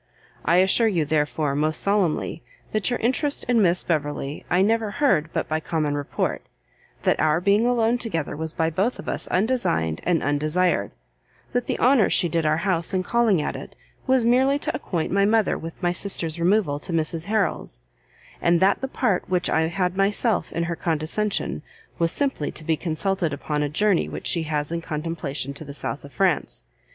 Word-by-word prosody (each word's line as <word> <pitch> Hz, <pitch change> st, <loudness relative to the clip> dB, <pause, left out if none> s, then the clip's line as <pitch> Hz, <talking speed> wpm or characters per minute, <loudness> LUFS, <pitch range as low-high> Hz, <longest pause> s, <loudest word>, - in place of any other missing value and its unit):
I 170 Hz, -, +3 dB
assure 190 Hz, +5 st, +5 dB
you, 175 Hz, -8 st, +1 dB
therefore, 150 Hz, -1 st, 0 dB
most 155 Hz, +2 st, +1 dB
solemnly, 195 Hz, -5 st, 0 dB, 0.3 s
that 215 Hz, +1 st, 0 dB
your 245 Hz, -, 0 dB
interest 265 Hz, +5 st, 0 dB
in 235 Hz, -2 st, +3 dB
Miss 175 Hz, -2 st, +3 dB
Beverley 145 Hz, -3 st, -2 dB
I 180 Hz, +2 st, +3 dB
never 225 Hz, +1 st, +1 dB
heard 200 Hz, -, +1 dB
but -, -, -2 dB
by 155 Hz, 0 st, -1 dB
common 155 Hz, -2 st, -1 dB
report, 145 Hz, -1 st, -2 dB, 0.6 s
that -, -, +2 dB
our 155 Hz, +1 st, +3 dB
being 200 Hz, +5 st, +3 dB
alone 240 Hz, 0 st, +2 dB
together 165 Hz, -, -2 dB
was 160 Hz, +1 st, -3 dB
by 160 Hz, 0 st, 0 dB
both 195 Hz, +10 st, 0 dB
of -, -, -10 dB
us -, -, -1 dB
undesigned 180 Hz, -, 0 dB
and 175 Hz, -3 st, +1 dB
undesired, 150 Hz, -, +1 dB, 0.6 s
that 245 Hz, -1 st, -1 dB
the -, -, -1 dB
honour 250 Hz, -3 st, +4 dB
she 175 Hz, -, +3 dB
did 165 Hz, -1 st, 0 dB
our 155 Hz, +1 st, +2 dB
house 185 Hz, -1 st, 0 dB
in 185 Hz, -, +1 dB
calling 220 Hz, -6 st, +2 dB
at -, -, -3 dB
it, -, -, -9 dB, 0.3 s
was 260 Hz, -3 st, +3 dB
merely 260 Hz, +4 st, +4 dB
to -, -, -3 dB
acquaint 170 Hz, -4 st, -3 dB
my 200 Hz, 0 st, +3 dB
mother 215 Hz, +1 st, +2 dB
with 165 Hz, 0 st, -8 dB
my 175 Hz, -, +2 dB
sister's 175 Hz, -3 st, -2 dB
removal 170 Hz, -5 st, +2 dB
to 160 Hz, -, -7 dB
Mrs 165 Hz, 0 st, -1 dB
Harrel's, 200 Hz, -, -1 dB, 0.6 s
and 170 Hz, 0 st, +3 dB
that 190 Hz, +2 st, +3 dB
the 265 Hz, -, -2 dB
part 220 Hz, -10 st, -1 dB
which 180 Hz, -1 st, +1 dB
I 160 Hz, 0 st, +2 dB
had 180 Hz, +1 st, -1 dB
myself 205 Hz, +2 st, +1 dB
in 170 Hz, -, -1 dB
her 170 Hz, 0 st, -2 dB
condescension, 170 Hz, +6 st, -2 dB, 0.4 s
was 165 Hz, -1 st, +2 dB
simply 270 Hz, -, -1 dB
to -, -, -7 dB
be 160 Hz, +1 st, +1 dB
consulted 170 Hz, +1 st, -1 dB
upon 150 Hz, +1 st, -2 dB
a 145 Hz, -, 0 dB
journey 200 Hz, +4 st, +2 dB
which -, -, -7 dB
she 170 Hz, -, +1 dB
has 150 Hz, 0 st, -1 dB
in 170 Hz, 0 st, -2 dB
contemplation 155 Hz, -4 st, -4 dB
to 140 Hz, -, -8 dB
the 140 Hz, -1 st, -9 dB
South 145 Hz, -, -4 dB
of 140 Hz, -, -11 dB
France. 180 Hz, -, 0 dB
175 Hz, 190 wpm, -24 LUFS, 155-210 Hz, 0.6 s, assure